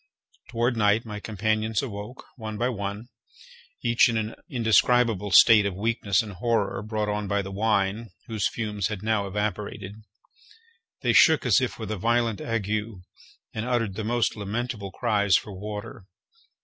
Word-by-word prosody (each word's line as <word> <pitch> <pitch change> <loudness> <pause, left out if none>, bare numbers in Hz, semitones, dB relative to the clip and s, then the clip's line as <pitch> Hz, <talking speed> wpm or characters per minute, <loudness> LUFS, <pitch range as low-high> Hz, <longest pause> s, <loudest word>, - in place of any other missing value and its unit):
Toward 120 +1 0
night 105 +1 +2
my 105 -2 -6
companions 110 +2 -1
awoke, 105 0 -7
one 110 -3 -6
by 120 +3 0
one, 100 0 -5 0.7
each 120 0 +4
in 115 - 0
an 110 0 -2 0.2
indescribable 115 -3 +2
state 105 +1 +7
of 95 - -4
weakness 100 -2 0
and 105 - -8
horror, 105 0 -1
brought 105 0 -2
on 105 0 -2
by 100 0 0
the 95 - -7
wine, 105 +1 0 0.2
whose 110 -3 -1
fumes 105 -3 -3
had 105 -2 -6
now 110 -2 0
evaporated. 105 0 -4 1.1
They - - +2
shook 160 -2 +5
as 120 0 +4
if 130 - -2
with 110 -2 -6
a 110 - -2
violent 115 +1 0
ague, 110 -3 -2 0.8
and 110 - -3
uttered 115 -5 0
the 110 +3 -4
most 120 +1 0
lamentable 105 0 -4
cries 100 0 +1
for 105 - -1
water. 105 +2 -7
110 Hz, 155 wpm, -25 LUFS, 100-115 Hz, 1.1 s, state